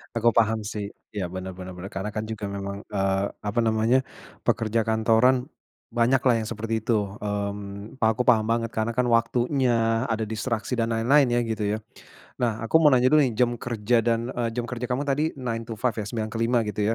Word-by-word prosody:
aku 115 +1 +4
paham 110 -1 +2
sih. 105 -1 -4 0.2
Ya, 100 -3 -3
benar 95 +1 -6
benar 95 0 -7
benar. 90 +2 -7
Karena 95 +2 -4
kan 110 - -1
juga 110 -2 -5
memang, 100 0 -5
eee, 95 -1 0 0.2
apa 105 +2 -1
namanya, 115 +2 +3 0.5
pekerja 115 0 +1
kantoran, 115 +4 +3 0.4
banyaklah 120 +1 +3
yang 110 - -4
seperti 115 0 -2
itu. 105 -4 0
Mmm, 100 +1 -5
pa 110 -3 +3
aku 110 - -1
paham 115 -3 +4
banget 115 0 0
karena 110 +1 -1
kan 125 +1 +1
waktunya, 115 0 +2
ada 110 -1 -1
distraksi, 110 +3 -2
dan 115 - +2
lain-lain 130 +5 +4
ya, - - +3
gitu 110 -2 -2
ya. - - -3 0.6
Nah, 115 -2 0
aku 140 +8 +4
mau 150 - +7
nanya 130 -1 +4
dulu 155 0 +6
nih 130 -4 +1
jam 125 -1 +3
kerja 120 0 0
dan, 115 +2 0
eee, 120 -1 -1
jam 120 -1 -1
kerja 125 0 -4
kamu 125 +3 0
tadi 145 +2 +1
nine-to-five 115 -1 -2
ya, - - -5
9.00 110 -2 -3
ke 115 - -3
5.00, 120 +1 +3
gitu 105 0 -3
115 Hz, 195 wpm, -25 LUFS, 105-120 Hz, 0.6 s, mau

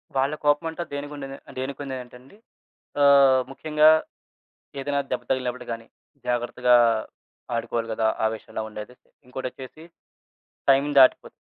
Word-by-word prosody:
వాళ్ళ 135 +2 +1
కోపం 145 +3 +3
అంటే 165 +2 -5
దేనికుండేద 145 -1 -6 0.3
దేనికుండేదంటేండి, 130 +1 -7 0.7
ఆహ్, 140 -2 +6
ముఖ్యంగా 150 +2 +3 0.9
ఏదైనా 140 +1 -1
దెబ్బ 125 -1 -2
తగిలినప్పుడు 125 -1 -2
గాని, 115 0 -6 0.4
జాగ్రత్తగా 125 0 +2 0.8
ఆడుకోవాలి 115 0 -2
గదా! 110 0 +1 0.2
ఆ - - +3
విషయంలో 110 - -7
ఉండేది. 105 +3 -9 0.3
ఇంకోటొచ్చేసి 130 +3 -8 0.9
టైమ్ 135 +2 +4
దాటిపోతుంది. 130 - +4
130 Hz, 105 wpm, -24 LUFS, 125-140 Hz, 0.9 s, ఆహ్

